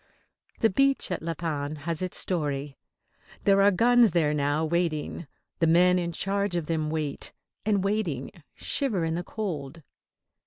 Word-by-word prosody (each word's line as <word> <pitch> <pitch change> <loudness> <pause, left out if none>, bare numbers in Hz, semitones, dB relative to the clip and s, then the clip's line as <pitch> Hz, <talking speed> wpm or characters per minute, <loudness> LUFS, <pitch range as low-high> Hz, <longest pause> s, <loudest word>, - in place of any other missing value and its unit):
The 225 - +4
beach 275 +2 +2
at 180 - -2
La 165 +1 -3
Panne 150 -2 -3
has 160 +3 -3
its 185 -1 -2
story. 145 -5 -2 0.7
There 195 0 +5
are 200 - +6
guns 235 +1 +4
there 155 -4 +2
now, 145 +2 +1
waiting. 165 -1 -1 0.3
The 165 - +3
men 180 +2 +5
in 170 -1 -2
charge 200 +2 -1
of 170 -3 -1
them 155 -1 -1
wait, 155 -2 -3 0.4
and, 200 -3 +2
waiting, 195 - -1 0.2
shiver 215 -12 0
in 160 - -1
the 175 +2 -2
cold. 165 -8 -5
170 Hz, 155 wpm, -27 LUFS, 155-195 Hz, 0.7 s, are